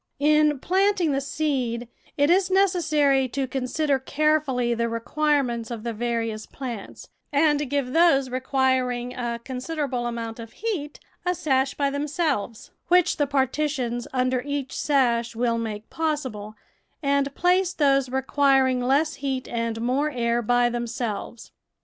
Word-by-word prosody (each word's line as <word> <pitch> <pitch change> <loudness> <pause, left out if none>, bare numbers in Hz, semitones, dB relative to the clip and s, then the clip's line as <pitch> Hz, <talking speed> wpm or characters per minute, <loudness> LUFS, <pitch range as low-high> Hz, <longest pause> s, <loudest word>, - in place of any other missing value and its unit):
In 300 0 +3
planting 375 +1 +2
the 275 0 0
seed, 260 -5 -2 0.3
it 285 +3 +4
is 370 +1 +3
necessary 310 -8 +3
to 265 +2 -2
consider 265 +2 -1
carefully 280 -4 +1
the 235 0 -1
requirements 240 0 0
of 230 -3 -6
the 235 -1 -3
various 230 -1 -2
plants, 240 -7 -7 0.2
and 295 -1 +2
give 275 -2 -1
those 325 -6 +4
requiring 255 -1 0
a 240 -2 -3
considerable 260 -2 -3
amount 230 -1 -5
of 230 -1 -9
heat 345 -10 -4 0.2
a 360 0 0
sash 270 -5 +1
by 280 -1 0
themselves, 285 - -2 0.2
which 360 -1 +3
the 290 - +1
partitions 265 -3 -1
under 255 -1 +1
each 285 -1 -4
sash 235 -5 +1
will 235 0 0
make 215 -2 -5
possible, 260 -10 -3 0.5
and 280 0 +1
place 360 +1 +2
those 275 -6 +2
requiring 265 -1 +2
less 285 +5 +1
heat 265 -2 -2
and 230 -1 -2
more 265 +5 +1
air 235 -3 0
by 245 +1 +3
themselves. 235 -1 -4
265 Hz, 135 wpm, -24 LUFS, 240-295 Hz, 0.5 s, it